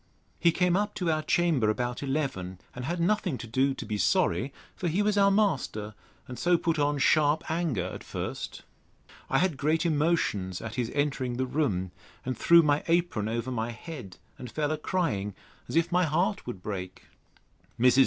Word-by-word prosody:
He 170 - +5
came 180 +1 +2
up 205 +1 0
to 175 -4 0
our 155 0 +1
chamber 155 -9 +2
about 120 +2 -1
eleven, 135 -11 -2 0.2
and 125 0 -6
had 175 +4 -2
nothing 180 -4 +1
to 120 - -7
do 130 +4 +1
to - - -6
be 105 -1 -3
sorry; 90 +6 +2 0.2
for 180 - -3
he 180 +6 +1
was 210 0 +2
our 200 -1 +5
master, 145 - 0 0.3
and 125 - -7
so 175 0 +4
put 165 -2 0
on 145 0 +2
sharp 150 +2 +3
anger 160 - 0
at 95 - -6
first. - - -5 0.7
I - - +3
had 180 -5 +1
great 155 +5 +1
emotions 150 - +1
at 110 0 -6
his 120 -3 -1
entering 135 -4 0
the 130 - 0
room, 110 - -1 0.3
and 130 0 -1
threw 170 0 +6
my 145 -1 +2
apron 165 -11 +1
over 115 +3 -2
my 115 -1 -2
head, 120 - -8 0.2
and 125 - -7
fell 150 +4 -1
a 155 - 0
crying, 110 - -1 0.3
as - - -4
if 165 +1 +2
my 180 +1 +3
heart 180 +6 0
would 100 -7 -6
break. 95 -3 -5 0.8
Mrs. 125 +2 +5
145 Hz, 185 wpm, -28 LUFS, 115-170 Hz, 0.8 s, threw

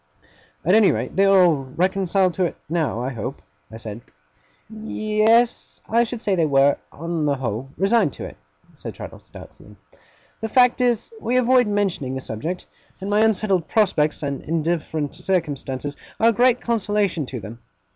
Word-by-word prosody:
'At 180 - +3
any 215 -2 +6
rate, - - -3
they 195 - +4
are 195 -1 +6
all 170 -4 +4 0.2
reconciled 185 0 +1
to 185 - 0
it 170 - -3
now, 155 -7 -1
I 130 - -2
hope?' 125 +4 -5 0.4
said 115 0 -7
I. 75 - -25
'Ye 215 -1 -3
yes, 230 +2 +3
I 235 +2 +3
should 230 0 -5
say 205 - 0
they 165 -4 +2
were, 140 0 +4
on 165 0 -3
the 145 -1 +2
whole, 125 0 -4
resigned 200 +7 +3
to - - -7
it,' - - -10 0.4
said - - -8
Traddles, - - -10
doubtfully. - - -14 0.6
'The 220 - -4
fact 250 +1 +4
is, 245 - +1
we 250 +2 0
avoid 255 -1 +4
mentioning 195 -11 -1
the 130 - -4
subject; 155 +12 -5 0.3
and 195 +2 -4
my 205 - +3
unsettled 210 -5 +2
prospects 155 -9 +1
and 140 -1 -3
indifferent 160 -2 -2
circumstances 145 -6 -2 0.2
are 225 - +5
a - - +2
great 245 +2 +3
consolation 205 - 0
to 125 - -5
them. 110 +3 -9
180 Hz, 170 wpm, -22 LUFS, 140-215 Hz, 0.6 s, any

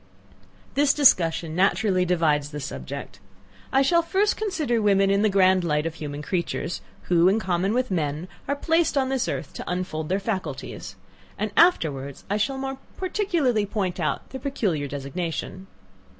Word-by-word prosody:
This 285 0 +3
discussion 165 - +3
naturally 185 0 +2
divides 155 -5 +1
the 150 0 -6
subject. 140 -5 -7 0.5
I 270 +1 +4
shall 340 +5 +4
first 395 +5 +1
consider 315 - -1
women 195 -1 +3
in 200 0 +3
the 215 - +3
grand 190 -2 +4
light 150 -2 0
of 165 - -2
human 150 -1 -6
creatures, 170 -1 -2 0.2
who, 175 0 +4
in 205 +3 +2
common 185 -1 0
with 250 -1 0
men, 155 -1 -1 0.2
are 280 - 0
placed 325 +1 +1
on 265 -1 +2
this 265 -2 0
earth 145 - -4
to - - -7
unfold 180 -4 -3
their 190 +2 +1
faculties; 185 - -5 0.4
and 210 0 -2
afterwards 140 - +2
I 205 - +2
shall 265 +6 0
more 270 0 -4 0.2
particularly 335 - 0
point 190 -3 -2
out 155 - -2
their 265 - -7
peculiar 200 - -1
designation. 160 +6 -5
190 Hz, 160 wpm, -25 LUFS, 160-265 Hz, 0.5 s, I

